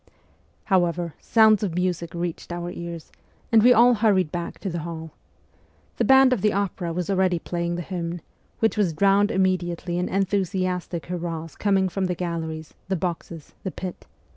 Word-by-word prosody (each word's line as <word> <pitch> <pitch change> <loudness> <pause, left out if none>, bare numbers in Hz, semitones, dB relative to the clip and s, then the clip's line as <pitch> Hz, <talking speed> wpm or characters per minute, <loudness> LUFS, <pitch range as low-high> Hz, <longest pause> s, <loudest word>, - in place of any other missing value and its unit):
However, 175 -4 +1
sounds 220 -2 +4
of 190 -6 -2
music 175 -2 -1
reached 170 0 -4
our 175 0 -4
ears, 170 -2 -7 0.4
and 225 -1 +6
we 245 +3 +7
all 245 +1 +7
hurried 205 -7 +2
back 175 -1 -4
to 195 - -3
the 170 - -3
hall. 160 0 -6 0.9
The - - +1
band 265 -1 +6
of 230 - -1
the 210 +1 +2
opera 195 -3 -2
was 175 +1 -3
already 190 -2 +2
playing 170 +1 -3
the 175 - -4
hymn, 175 -1 -4 0.4
which 225 0 +1
was 190 -6 +2
drowned 200 +4 +3
immediately 180 -3 0
in 180 - -1
enthusiastic 185 -3 -1
hurrahs 165 -2 -5
coming 195 -2 +2
from 190 +1 -2
the 180 -1 -1
galleries, 160 -3 -4
the 190 - 0
boxes, 170 -2 -5
the 190 - -3
pit. 185 0 -7
180 Hz, 165 wpm, -24 LUFS, 170-195 Hz, 0.9 s, we